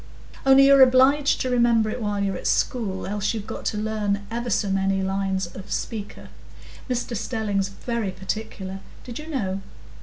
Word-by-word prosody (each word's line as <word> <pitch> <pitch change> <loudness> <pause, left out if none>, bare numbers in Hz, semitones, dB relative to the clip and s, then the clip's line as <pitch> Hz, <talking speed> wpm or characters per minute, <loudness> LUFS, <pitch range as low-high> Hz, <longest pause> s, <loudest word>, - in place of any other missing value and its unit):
"Only 270 0 +8
you're 275 0 +7
obliged 265 +3 +5
to 255 - -1
remember 235 -2 +3
it 245 - -5
while 205 -1 -1
you're 195 -1 -1
at - - -4
school, 205 -7 0
else 210 +2 -1
you've 210 -2 -5
got - - -7
to 210 - -1
learn 210 -1 -1
ever 240 +1 -3
so 205 -2 +1
many 195 0 +1
lines 190 0 -1
of 190 +3 -10
'Speaker.' 210 -3 -5 0.6
Mr 245 -1 -2
Stelling's 205 -3 -1
very 230 +1 -3
particular—did 195 +4 -6
you 305 - -9
know? 195 -11 -2
210 Hz, 160 wpm, -24 LUFS, 195-240 Hz, 0.6 s, Only